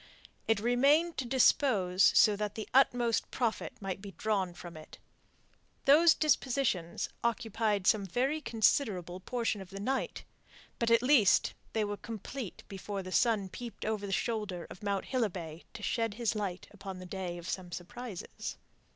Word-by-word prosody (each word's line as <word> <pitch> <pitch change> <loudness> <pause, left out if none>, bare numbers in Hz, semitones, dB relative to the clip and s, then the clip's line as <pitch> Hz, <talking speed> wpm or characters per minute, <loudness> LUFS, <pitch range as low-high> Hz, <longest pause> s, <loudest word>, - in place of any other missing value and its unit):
It 225 -2 +3
remained 280 +9 +3
to 265 - -2
dispose 220 -7 +4
so 210 -2 +6
that 210 0 -3
the 220 - -5
utmost 245 -3 +3
profit 235 -3 -2
might 195 -1 -4
be 200 -1 -9
drawn 200 -4 -1
from 175 -1 -10
it. 155 0 -12 0.9
Those 315 +4 +7
dispositions 260 - 0 0.2
occupied 220 -3 0
some 200 0 +3
very 265 - 0
considerable 215 - +1
portion 225 0 -2
of 190 - -10
the 195 +1 -8
night. 260 +6 -2 0.6
But, 235 - +1
at 230 0 +5
least, 250 -7 +5 0.2
they 220 - +1
were 205 0 -3
complete 230 +1 -7
before 195 0 -5
the 185 - -7
sun 215 -2 +2
peeped 235 +5 -8
over 210 -2 -2
the - - -5
shoulder 210 -4 -2
of - - -11
Mount 200 -2 -1
Hilibay 180 - -3
to 210 - -8
shed 225 -2 -1
his 235 -1 0
light 200 -4 -3
upon 190 -2 -8
a 185 - -8
day 180 -1 -5
of 175 0 -9
some 180 -2 -4
surprises. 205 +3 -7
215 Hz, 160 wpm, -31 LUFS, 190-245 Hz, 0.9 s, Those